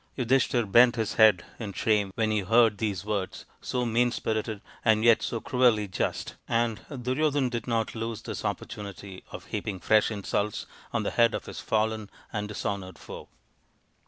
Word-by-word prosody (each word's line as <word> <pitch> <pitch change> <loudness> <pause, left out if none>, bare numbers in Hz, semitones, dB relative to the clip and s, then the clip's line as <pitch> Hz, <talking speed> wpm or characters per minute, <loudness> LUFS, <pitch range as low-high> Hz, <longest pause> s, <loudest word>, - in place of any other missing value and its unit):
Yudhishthir 125 -1 +2
bent 120 +3 +7
his 110 -3 -1
head 110 -4 +5
in 105 -4 -5
shame 105 -1 +1
when 110 -1 +1
he 105 - +2
heard 110 +1 +4
these 100 -4 -2
words, 100 -3 -3 0.2
so 125 -1 -1
mean 120 +1 +2
spirited 110 -2 -2 0.2
and 110 -1 +3
yet 115 -1 +6
so 115 - -2
cruelly 120 -4 +2
just, 95 - -2 0.2
and 115 -2 +1
Duryodhan 135 +1 0
did 120 -2 -4
not 115 -2 0
lose 115 -1 -4
this - - -5
oppor 105 -1 -2
tunity 100 -3 -8
of - - -8
heaping 95 -3 -4
fresh 110 +3 +3
insults 105 -1 -2 0.3
on - - -1
the - - -1
head 115 -1 +3
of - - -5
his - - -7
fallen 110 -1 -1 0.2
and 105 -1 -2
dishonoured 100 -3 -4
foe. - - -10
110 Hz, 170 wpm, -27 LUFS, 105-120 Hz, 0.3 s, bent